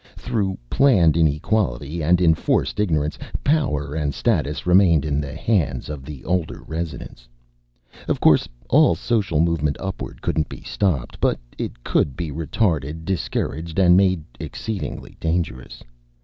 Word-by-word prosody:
Through 100 -5 -2
planned 90 - +4
inequality 80 - 0
and 85 +3 +3
enforced 80 +4 +2
ignorance, 75 -7 0 0.2
power 75 - +1
and 75 -3 -2
status 75 +3 0
remained 90 -5 +5
in 75 -1 0
the 70 0 -6
hands 80 - 0
of 75 -3 -6
the 75 -3 -9
older 90 -2 -2
residents. 80 -6 -6 0.8
Of - - 0
course, - - +4 0.2
all - - +5
social 105 -10 0
movement 80 -3 +1
upward 95 -1 -6
couldn't 80 -2 0
be - - -9
stopped. 85 -11 -1
But - - +2 0.2
it - - -6
could 70 - 0
be 85 -3 -3
retarded, 80 - -1
discouraged, 85 -3 -3
and 90 -2 +6
made 95 -3 +3 0.2
exceedingly 110 -3 -5
dangerous. 80 -8 -3
80 Hz, 135 wpm, -22 LUFS, 75-95 Hz, 0.8 s, and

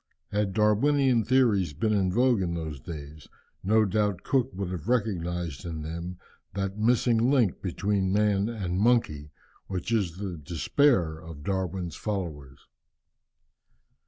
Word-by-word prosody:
Had 105 -1 0
Darwinian 120 +4 +3
theories 105 - +2
been 110 +9 0
in 95 -3 +2
vogue 120 0 +3
in 85 -2 -1
those 80 -4 -5
days, 75 +1 -9 0.3
no 110 +3 +3
doubt 100 -2 0
Cook 130 -2 +1
would 95 -1 -3
have 90 0 -6
recognized 90 - -1
in 80 -3 -5
them 85 +3 -5 0.4
that 95 0 -2
missing 120 +1 +3
link 125 -10 +2
between 95 +1 -1
man 105 0 +2
and 95 -6 -3
monkey, 100 -11 +2 0.4
which 95 +3 -4
is 95 -7 0
the 95 -3 -5
despair 85 - +1
of 80 -3 -10
Darwin's 95 -2 -2
followers. 80 -10 -5
95 Hz, 130 wpm, -27 LUFS, 85-110 Hz, 0.4 s, Darwinian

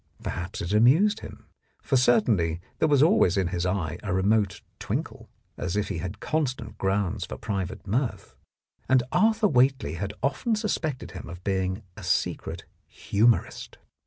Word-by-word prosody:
Perhaps 85 +1 -4
it 85 +4 -3
amused 160 - +5
him, - - -11 0.4
for 135 - 0
certainly 105 -10 +3 0.2
there 160 - +3
was 145 -2 +4
always 190 - +4
in 95 -3 +1
his 90 0 -1
eye 90 -5 -2
a 105 - -4
remote 100 +1 +1 0.2
twinkle, - - -4 0.3
as 90 +1 -3
if 105 - -1
he 80 - -3
had 90 +4 -5
constant 150 -5 -2
grounds 95 -1 0
for - - -7
private 95 -2 -4
mirth, 115 +5 -2 0.6
and 130 -1 +5
Arthur 220 0 +3
Whately 130 - +2
had 100 +3 -4
often 140 - +1
suspected 170 - -2
him - - -8
of 90 +1 -9
being 95 +1 -1
a 105 - -10
secret 90 0 -1 0.2
humourist. 115 +3 0
105 Hz, 155 wpm, -26 LUFS, 95-135 Hz, 0.6 s, amused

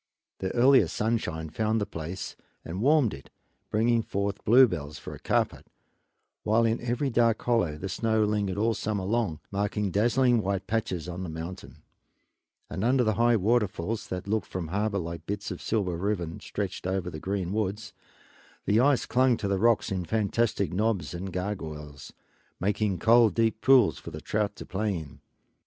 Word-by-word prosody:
The 95 - -2
earliest 125 -7 +5
sunshine 90 -9 -1
found 110 +4 0
the 100 - -1
place 85 -1 -6 0.3
and 90 +4 -5
warmed 140 -3 +4
it, 70 - -11 0.4
bringing 115 +2 +2
forth 100 -2 -2
the - - -28
bluebells 90 - +4
for - - -8
a - - -10
carpet, - - -1 0.7
while 115 +2 +2
in 115 0 0
every 125 +3 -1
dark 115 -1 +3
hollow 110 -11 +1
the 95 - -5
snow 110 +3 +1
lingered 105 -2 0
all 115 +2 +2
summer 105 -3 -2
long, 100 -7 -1
making 100 0 -1
dazzling 120 +4 +3
white 95 -1 -2
patches 95 -7 -2
on 90 +1 -5
the 90 - -4
mountain; 80 -3 -8 0.8
and 95 - -4
under 125 +2 +3
the 110 -2 +2
high 120 +2 +3
waterfalls, 110 -1 0
that 95 +1 -5
looked 110 -2 -1
from 90 -2 -4
the 80 - -9
harbor 105 +1 0
like 85 -2 -5
bits 100 +1 -3
of 90 - -6
silver 100 -6 -1
ribbon 90 -3 -2
stretched 100 -2 -4
over 95 -1 -2
the 80 - -7
green 95 0 -2
woods, 105 0 -2 0.7
the 105 +2 +3
ice 135 +1 +3
clung 125 -1 +3
to 100 - -3
the 100 -1 0
rocks 115 0 +3
in 95 -2 -1
fantastic 105 0 0
knobs 105 -1 0
and 95 +2 -5
gargoyles, 80 -6 -5 0.5
making 100 0 0
cold, 115 +3 +5
deep 115 -1 +1
pools 125 - +5
for - - -8
the - - -7
trout 105 -1 -1
to - - -9
play 100 -1 -1
in. 80 -4 -10
100 Hz, 175 wpm, -27 LUFS, 90-115 Hz, 0.8 s, earliest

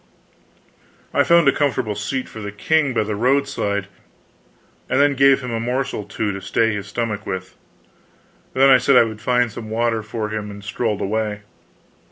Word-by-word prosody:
I - - +4
found 170 -3 +4
a - - +7
comfortable 130 -7 0
seat 125 +6 -3
for 110 - -10
the 105 -1 -5
king 145 +7 +1
by 120 - +1
the 105 0 -3
roadside, 120 -5 0 1.0
and 130 - +2
then 145 0 +4
gave 135 0 +4
him 125 -2 -5
a 115 - -2
morsel 125 +3 -2
or 105 - -12
two 110 -1 -2
to 100 0 -6
stay 115 +2 +1
his 100 -1 -5
stomach 105 0 -3
with. 95 0 -5 1.0
Then 135 +1 +6
I 130 - +7
said 130 +2 +3
I - - +8
would 110 -1 -6
find 125 -1 +1
some 110 +1 -8
water 115 0 0
for 110 0 -4
him, 105 -1 -4
and 100 0 -10
strolled 105 0 -2
away. 105 0 -2
115 Hz, 185 wpm, -21 LUFS, 105-130 Hz, 1.0 s, I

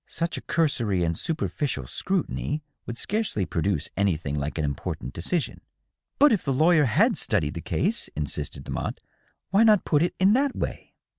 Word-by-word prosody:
Such 170 0 -2
a - - -4
cursory 120 - +1
and 85 0 0
superficial 145 - -2
scrutiny 155 - -2 0.2
would 120 - -5
scarcely 210 - 0
produce 85 -3 0
anything 85 -7 0
like 75 +2 -3
an 80 - 0
important 70 -2 -4
decision." 155 - -2 0.3
" - - -59
But 290 0 +6
if 205 - +2
the 140 - 0
lawyer 155 +2 +4
had 115 - +3
studied 75 0 +1
the - - -5
case - - 0
!" - - -43
insisted 75 -1 -4
Demotte. - - -3 0.3
" - - -43
Why 200 +3 +5
not 215 -3 +5
put 150 -2 +3
it 175 - 0
in 190 +2 +5
that 275 +2 +2
way?" - - -5
140 Hz, 180 wpm, -26 LUFS, -, 0.3 s, But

